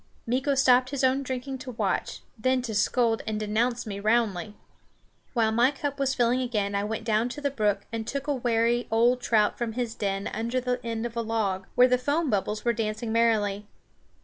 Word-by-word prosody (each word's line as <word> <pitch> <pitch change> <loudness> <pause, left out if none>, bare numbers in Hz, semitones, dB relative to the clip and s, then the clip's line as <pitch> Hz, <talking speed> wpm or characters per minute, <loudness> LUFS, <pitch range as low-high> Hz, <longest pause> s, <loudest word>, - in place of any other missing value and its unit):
Meeko 265 +4 +1
stopped 255 -1 +5
his 275 -1 -3
own 260 +1 +3
drinking 260 0 -4
to 255 - -8
watch, - - -2
then 255 +2 +1
to 230 -3 -4
scold 225 +2 +2
and 215 -1 -2
denounce 235 +3 0
me 200 -2 -5
roundly. 215 -2 0 0.8
While 225 -3 +2
my 235 +3 +4
cup 285 0 -4
was 270 -1 +1
filling 245 +1 +2
again 210 -5 -1
I 200 0 0
went 220 +1 -3
down 225 +1 +1
to 255 - -6
the 285 -1 -1
brook 210 -6 0
and 225 -1 -3
took 280 0 -3
a 295 - 0
wary 240 -1 +1
old 240 +3 +3
trout 215 -4 +2
from 235 -2 -2
his 240 -1 -2
den 195 -2 -2
under 235 +3 -1
the 250 0 -2
end 230 0 -3
of 240 -1 -5
a 235 - 0
log, 210 -4 -1
where 250 +1 +7
the 250 0 +2
foam 290 +3 0
bubbles 210 +2 -1
were 235 - +3
dancing 220 0 -3
merrily. 210 -3 +1
235 Hz, 200 wpm, -27 LUFS, 215-255 Hz, 0.8 s, where